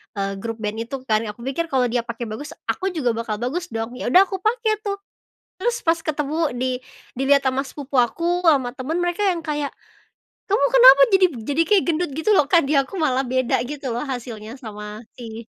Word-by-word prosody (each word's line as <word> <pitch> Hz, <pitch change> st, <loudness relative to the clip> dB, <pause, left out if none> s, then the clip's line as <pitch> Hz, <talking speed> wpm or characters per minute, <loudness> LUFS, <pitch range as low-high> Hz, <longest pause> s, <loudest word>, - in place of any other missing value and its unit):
eee, 195 Hz, -1 st, -3 dB
grup 225 Hz, +2 st, -4 dB
band 210 Hz, +1 st, -3 dB
itu 265 Hz, +1 st, -6 dB
kan. 220 Hz, -4 st, +2 dB
Aku 210 Hz, +3 st, -8 dB
pikir 275 Hz, +6 st, -2 dB
kalau 265 Hz, -5 st, +1 dB
dia 245 Hz, -, +1 dB
pake 235 Hz, 0 st, -5 dB
bagus, 265 Hz, +8 st, -7 dB
aku 380 Hz, -, -2 dB
juga 255 Hz, -7 st, +1 dB
bakal 230 Hz, -1 st, -3 dB
bagus 340 Hz, +9 st, -2 dB
dong! 225 Hz, -5 st, -4 dB
Ya -, -, -3 dB
udah 360 Hz, +10 st, +7 dB
aku 385 Hz, 0 st, -5 dB
pake 440 Hz, 0 st, 0 dB
tuh. 400 Hz, -, 0 dB, 0.7 s
Terus 475 Hz, +4 st, -1 dB
pas 330 Hz, 0 st, +2 dB
ketemu, 310 Hz, -2 st, -1 dB
di 250 Hz, 0 st, -1 dB, 0.3 s
dilihat 275 Hz, +2 st, +2 dB
sama 265 Hz, 0 st, +1 dB
sepupu 275 Hz, -1 st, -1 dB
aku, 335 Hz, +10 st, 0 dB
sama 265 Hz, -6 st, +3 dB
temen 265 Hz, +5 st, -4 dB
mereka 350 Hz, +2 st, -1 dB
yang 340 Hz, -3 st, -1 dB
kayak, 295 Hz, -2 st, -2 dB, 0.8 s
"Kamu 410 Hz, +3 st, +2 dB
kenapa -, -, +9 dB
jadi 385 Hz, -1 st, +6 dB
b -, -, -11 dB
jadi 290 Hz, +6 st, +1 dB
kayak 410 Hz, -3 st, +5 dB
gendut?" 340 Hz, -1 st, 0 dB
Gitu 320 Hz, +7 st, +2 dB
loh, 300 Hz, -8 st, +4 dB
Kak 335 Hz, +1 st, +4 dB
di 275 Hz, -, -1 dB
aku 275 Hz, +8 st, -6 dB
malah 285 Hz, -7 st, +1 dB
beda 255 Hz, -1 st, +1 dB
gitu 280 Hz, -3 st, -4 dB
loh, 235 Hz, -, -2 dB
hasilnya 235 Hz, -2 st, -6 dB
sama 210 Hz, -1 st, -8 dB
si 230 Hz, -1 st, -8 dB
275 Hz, 205 wpm, -22 LUFS, 240-335 Hz, 0.8 s, kenapa